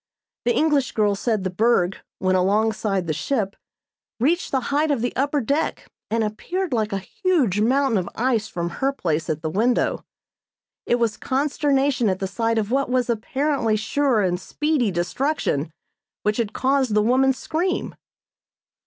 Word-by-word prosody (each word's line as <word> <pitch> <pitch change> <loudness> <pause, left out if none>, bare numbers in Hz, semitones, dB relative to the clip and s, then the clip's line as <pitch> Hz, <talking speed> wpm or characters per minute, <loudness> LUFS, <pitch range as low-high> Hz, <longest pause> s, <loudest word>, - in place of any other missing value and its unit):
The 240 - +2
English 295 -4 +2
girl 210 -2 +2
said 210 0 -1
the 185 - -2
berg, 195 -2 +2 0.2
when 185 0 +1
alongside 200 0 +1
the 160 - -1
ship, 205 - -1 0.6
reached 325 +9 +1
the 265 - +1
height 305 +2 +2
of 280 -6 +1
the 245 - -2
upper 285 +2 +1
deck 285 +7 -2 0.2
and 225 0 +1
appeared 335 - -3
like 220 -2 0
a 195 - 0
huge 290 - 0
mountain 260 -1 +2
of 180 - -4
ice 230 -3 +1
from 170 -4 -4
her 270 +1 +3
place 165 - -2
at 155 +1 -2
the 160 - -1
window. 235 +6 +1 0.8
It 240 - +3
was 230 -3 0
consternation 275 -3 +1
at 185 - 0
the 190 - -3
sight 225 +4 -1
of 215 0 -1
what 275 0 +1
was 250 -1 +1
apparently 250 +1 0
sure 240 +2 +1
and 180 -1 0
speedy 295 +1 0
destruction 175 - -1 0.5
which 210 0 +1
had 225 -3 -1
caused 265 -4 +1
the 210 - +4
woman's 260 +3 +3
scream. 355 +4 -2
235 Hz, 160 wpm, -23 LUFS, 205-275 Hz, 0.8 s, the